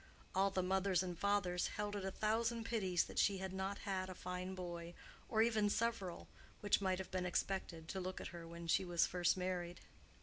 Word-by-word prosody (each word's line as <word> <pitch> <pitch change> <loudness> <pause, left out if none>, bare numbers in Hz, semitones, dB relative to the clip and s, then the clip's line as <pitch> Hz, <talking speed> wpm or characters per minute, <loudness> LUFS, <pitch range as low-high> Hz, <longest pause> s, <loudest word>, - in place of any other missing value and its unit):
All 195 +1 +4
the 190 -1 0
mothers 190 -1 +2
and 180 -1 -3
fathers 195 -2 +2
held 205 0 -1
it 200 - -3
a 190 - 0
thousand 225 +3 +1
pities 190 -7 +1
that - - -3
she 200 -1 +4
had 190 0 -4
not 190 +1 -2
had 190 -2 -2
a 185 - -6
fine 180 +1 -4
boy, 175 -1 -5 0.3
or 220 -1 +4
even 220 -3 +3
several—which 205 -2 -1
might 190 -1 +2
have 190 - -6
been 185 -1 0
expected, 175 -2 -1
to 190 - -2
look 185 0 -3
at - - -5
her 170 -1 -8
when 170 0 -7
she 165 - +3
was 175 -2 +3
first 175 0 +2
married. 180 -1 -2
190 Hz, 200 wpm, -39 LUFS, 180-200 Hz, 0.3 s, All